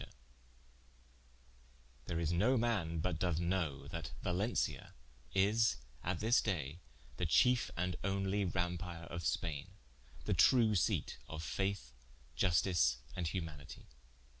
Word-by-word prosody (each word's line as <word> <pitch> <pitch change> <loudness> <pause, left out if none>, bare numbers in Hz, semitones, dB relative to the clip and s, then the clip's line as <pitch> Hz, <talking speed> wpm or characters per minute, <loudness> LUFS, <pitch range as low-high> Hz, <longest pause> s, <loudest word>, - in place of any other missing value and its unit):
_ - - -4 2.0
There 85 - -2
is 85 -1 0
no 115 +10 +3
man 95 -9 0
but 85 -2 -1
doth 90 -3 +1
knowe, 85 -6 -1
that 80 0 -5
Valencia 95 +6 -1 0.4
is 105 +4 +3 0.3
at 90 -1 -1
this 115 +3 +4
day, 85 -6 -2 0.4
the 90 - 0
chiefe 125 +9 +4
and 90 +1 0
onelye 95 0 0
Rampar 85 -2 -3
of 85 - -3
Spaine, 75 -2 -2 0.5
the - - +1
true 115 -4 +5
seate 85 -10 0
of 80 0 -6
Faith, 95 -2 -2 0.4
Iustice 85 -5 +3 0.2
and 90 -3 -1
humanity. 80 -5 -6
90 Hz, 120 wpm, -36 LUFS, 80-100 Hz, 2.0 s, true